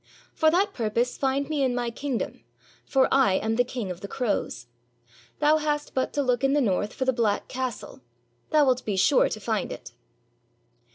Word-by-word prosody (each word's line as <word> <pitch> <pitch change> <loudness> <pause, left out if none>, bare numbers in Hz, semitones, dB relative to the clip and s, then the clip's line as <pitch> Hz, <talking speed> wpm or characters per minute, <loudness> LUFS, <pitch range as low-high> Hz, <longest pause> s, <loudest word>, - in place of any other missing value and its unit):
For 315 - +3
that 390 +5 +2
purpose 235 +2 -1
find 275 +1 0
me 305 -2 -1
in 255 -2 +1
my 240 -1 -1
king 270 +1 -3
dom, - - -5 0.4
for 265 -1 +3
I 265 -8 +4
am 220 +3 0
the 245 - +3
King 240 -6 -5
of 180 0 -8
the 200 - -6
Crows. 210 - -2 0.7
Thou 300 +1 +4
hast 295 -1 -2
but 260 - 0
to 285 - 0
look 250 0 0
in 270 0 +3
the 295 - +3
north 205 -4 0
for 260 - -3
the 260 - +2
black 225 -4 0
castle; 255 - -5 0.5
thou 300 -2 +4
'It 250 - -2
be 210 - -2
sure 275 +9 +4
to 215 - -5
find 215 -1 -2
it." 120 -1 -8
255 Hz, 195 wpm, -26 LUFS, 220-280 Hz, 0.7 s, I